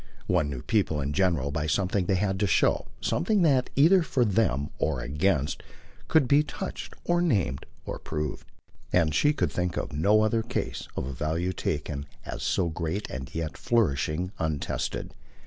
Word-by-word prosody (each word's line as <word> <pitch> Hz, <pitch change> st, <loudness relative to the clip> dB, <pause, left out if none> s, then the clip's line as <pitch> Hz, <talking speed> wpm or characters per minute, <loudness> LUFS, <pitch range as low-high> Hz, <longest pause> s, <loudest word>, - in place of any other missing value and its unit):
One 85 Hz, -5 st, +1 dB
knew 65 Hz, -3 st, -5 dB
people 100 Hz, -9 st, +1 dB
in 70 Hz, 0 st, -2 dB
general 85 Hz, -7 st, +1 dB
by 75 Hz, +1 st, -1 dB
something 90 Hz, +2 st, +1 dB
they 95 Hz, -, +3 dB
had 95 Hz, 0 st, 0 dB
to 105 Hz, -, +2 dB
show, -, -, +2 dB
something 200 Hz, +2 st, +1 dB
that, 135 Hz, -6 st, +3 dB
either 170 Hz, +7 st, +6 dB
for 130 Hz, -6 st, +1 dB
them 95 Hz, -, +1 dB
or 75 Hz, -5 st, 0 dB
against, 75 Hz, +3 st, 0 dB, 0.5 s
could 155 Hz, -5 st, +4 dB
be 140 Hz, +3 st, +5 dB
touched 190 Hz, +5 st, -6 dB
or 175 Hz, 0 st, +2 dB
named 100 Hz, -, 0 dB, 0.2 s
or -, -, -5 dB
proved; 75 Hz, -1 st, -4 dB, 0.4 s
and 80 Hz, -3 st, +3 dB
she 145 Hz, -, +4 dB
could 150 Hz, -, 0 dB
think 90 Hz, -1 st, -1 dB
of -, -, -3 dB
no 100 Hz, +9 st, +4 dB
other 110 Hz, +1 st, +2 dB
case 115 Hz, -, -3 dB
of -, -, -1 dB
a 70 Hz, -, -5 dB
value 80 Hz, +7 st, -1 dB
taken 75 Hz, -3 st, -3 dB, 0.2 s
as -, -, -5 dB
so 90 Hz, -, +1 dB
great 85 Hz, +4 st, -3 dB
and 65 Hz, 0 st, -7 dB
yet 80 Hz, -3 st, -3 dB
flourishing 90 Hz, -5 st, +1 dB
untested. 80 Hz, -3 st, -2 dB
90 Hz, 170 wpm, -27 LUFS, 75-110 Hz, 0.5 s, either